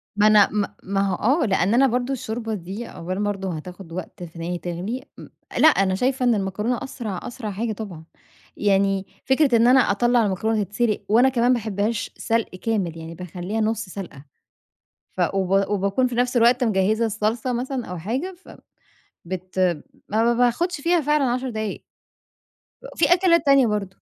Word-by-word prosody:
ما 210 Hz, +1 st, +4 dB
أنا 210 Hz, -2 st, +6 dB
ما 205 Hz, -1 st, -2 dB
ما 195 Hz, +1 st, -1 dB
هو 195 Hz, -2 st, 0 dB, 0.3 s
آه، -, -, +2 dB
لأن 195 Hz, 0 st, +1 dB
أنا 270 Hz, +3 st, +5 dB
برضه 250 Hz, +2 st, -1 dB
الشوربة 225 Hz, -2 st, -4 dB
دي 200 Hz, +4 st, -6 dB
أولًا 185 Hz, +3 st, -5 dB
برضه 195 Hz, -4 st, -2 dB
هتاخد 180 Hz, +2 st, -10 dB
وقت 180 Hz, 0 st, -7 dB
في 170 Hz, 0 st, -10 dB
إن 165 Hz, -, -7 dB
هي 175 Hz, +1 st, -3 dB
تغلي، 180 Hz, +9 st, -4 dB, 0.2 s
ام -, -, -11 dB, 0.3 s
لأ 315 Hz, -, +7 dB
أنا 195 Hz, -9 st, +3 dB
شايفة 255 Hz, +4 st, 0 dB
إن 240 Hz, -2 st, +4 dB
المكرونة 210 Hz, +5 st, -1 dB
أسرع 225 Hz, -8 st, -5 dB
أسرع 235 Hz, -4 st, -6 dB
حاجة 220 Hz, +3 st, -2 dB
طبعًا، 195 Hz, -7 st, -8 dB, 0.5 s
يعني 195 Hz, -1 st, +2 dB, 0.2 s
فكرة 265 Hz, -2 st, +3 dB
إن 230 Hz, +1 st, +5 dB
أنا 260 Hz, +1 st, +6 dB
أطلّع 240 Hz, +1 st, +3 dB
المكرونة 210 Hz, +2 st, 0 dB
تتسلق، 210 Hz, +2 st, -1 dB
وأنا 240 Hz, +5 st, +5 dB
كمان 245 Hz, -1 st, +2 dB
باحبهاش 215 Hz, -1 st, -2 dB
سلق 230 Hz, 0 st, 0 dB
كامل 185 Hz, -5 st, -2 dB
يعني 165 Hz, +1 st, -8 dB
باخليها 180 Hz, +5 st, -4 dB
نص 220 Hz, 0 st, -1 dB
سلقة، 180 Hz, -7 st, -9 dB, 0.9 s
ف 185 Hz, -, -6 dB
وب 195 Hz, +1 st, +1 dB
وباكون 200 Hz, +5 st, +1 dB
في 245 Hz, -, -4 dB
نفس 245 Hz, +1 st, 0 dB
الوقت 240 Hz, +2 st, +4 dB
مجهّزة 215 Hz, +1 st, +2 dB
الصلصة 220 Hz, +3 st, -1 dB
مثلًا 250 Hz, 0 st, -3 dB
أو 180 Hz, -1 st, -6 dB
حاجة، 260 Hz, -, -3 dB
فب -, -, -13 dB, 0.7 s
بت 185 Hz, +1 st, -6 dB, 0.5 s
ما 230 Hz, +3 st, +2 dB
ب -, -, -4 dB
باخدش 285 Hz, +7 st, +1 dB
فيها 340 Hz, +2 st, +2 dB
فعلًا 295 Hz, -1 st, +2 dB
10 255 Hz, +1 st, -1 dB
دقايق، 215 Hz, -2 st, -4 dB, 1.1 s
في -, -, +3 dB
أكلات 345 Hz, -3 st, +3 dB
تانية 275 Hz, -2 st, +6 dB
برضه 205 Hz, -3 st, -3 dB
215 Hz, 170 wpm, -23 LUFS, 190-245 Hz, 1.1 s, لأ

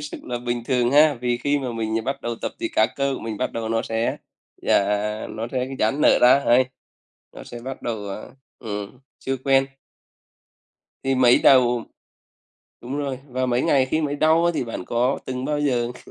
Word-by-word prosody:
sức 150 Hz, 0 st, -8 dB
là 125 Hz, -1 st, -4 dB
bình 120 Hz, 0 st, -3 dB
thường 125 Hz, -1 st, +1 dB
ha? 150 Hz, +1 st, +6 dB
Vì 120 Hz, -1 st, 0 dB
khi 145 Hz, +3 st, 0 dB
mà 130 Hz, -3 st, -4 dB
mình 110 Hz, -1 st, -2 dB
bắt 135 Hz, +2 st, -3 dB
đầu 120 Hz, 0 st, -3 dB
tập -, -, -3 dB
thì -, -, -1 dB
các 110 Hz, +1 st, +2 dB
cơ 140 Hz, -1 st, 0 dB
của -, -, -7 dB
mình 110 Hz, -1 st, -5 dB
bắt 130 Hz, -, -2 dB
đầu 115 Hz, -1 st, -4 dB
nó 115 Hz, 0 st, 0 dB
sẽ 115 Hz, +1 st, -1 dB, 0.4 s
dà -, -, +2 dB, 0.5 s
nó 110 Hz, +1 st, -5 dB
sẽ 130 Hz, -1 st, -1 dB
dãn 110 Hz, +7 st, +1 dB
nở -, -, +5 dB
ra 125 Hz, +3 st, +6 dB
hầy, 125 Hz, +2 st, +5 dB, 0.7 s
nó -, -, -11 dB
sẽ 120 Hz, -, -9 dB
bắt 130 Hz, +2 st, -7 dB
đầu, 120 Hz, -2 st, -2 dB
ờ, 100 Hz, +2 st, -8 dB, 0.2 s
ừm, 105 Hz, +1 st, -6 dB, 0.2 s
chưa 135 Hz, 0 st, -3 dB
quen. 135 Hz, -1 st, +4 dB, 1.4 s
Thì 135 Hz, 0 st, +1 dB
mới 125 Hz, -1 st, +5 dB
đầu 125 Hz, -3 st, +4 dB, 1.0 s
đúng 130 Hz, +4 st, -5 dB
rồi, 140 Hz, -3 st, -3 dB
và 130 Hz, 0 st, -1 dB
mấy 125 Hz, 0 st, +1 dB
ngày 135 Hz, -5 st, +3 dB
khi 155 Hz, +4 st, 0 dB
mới 145 Hz, -2 st, -2 dB
đau 160 Hz, +3 st, +3 dB
á 170 Hz, -, +4 dB
thì 130 Hz, -, -1 dB
bạn 115 Hz, -5 st, -6 dB
có 125 Hz, +6 st, 0 dB
từng 130 Hz, 0 st, -4 dB
bao 150 Hz, +1 st, -1 dB
giờ 125 Hz, -5 st, 0 dB
kh -, -, -15 dB
125 Hz, 205 wpm, -23 LUFS, 120-135 Hz, 1.4 s, ha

